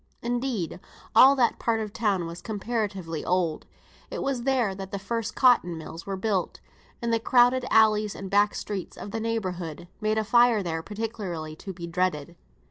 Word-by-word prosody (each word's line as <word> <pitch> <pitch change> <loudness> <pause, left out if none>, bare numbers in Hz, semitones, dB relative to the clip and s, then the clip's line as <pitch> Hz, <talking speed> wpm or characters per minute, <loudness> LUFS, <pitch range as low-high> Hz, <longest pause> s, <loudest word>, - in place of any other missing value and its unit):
Indeed 240 - -2 0.4
all 270 +2 +8
that 245 -3 +2
part 230 -1 +1
of 215 -1 -3
the - - -25
town 200 -6 +1
was 170 +1 -7
comparatively 205 -6 -3
old; 175 -3 0 0.4
it - - -4
was 270 -3 -1
there 250 -5 +1
that 190 0 -7
the 200 - -4
first 220 +3 -3
cotton 235 -10 +4
mills 165 +2 -9
were 195 -1 -3
built, 190 -2 -1 0.4
and 235 -1 0
the 230 - +3
crowded 245 +2 +4
alleys 215 -2 +4
and 195 - -6
back 205 +2 +3
streets 200 -3 -5
of 205 - -7
the 225 - -3
neighbourhood 185 -8 -3
made 215 0 +1
a 220 - +2
fire 235 -1 +4
there 165 -2 -2
particularly 195 -6 -5
to 195 - -7
be 170 -2 -7
dreaded. 170 -2 -1
205 Hz, 180 wpm, -26 LUFS, 180-230 Hz, 0.4 s, all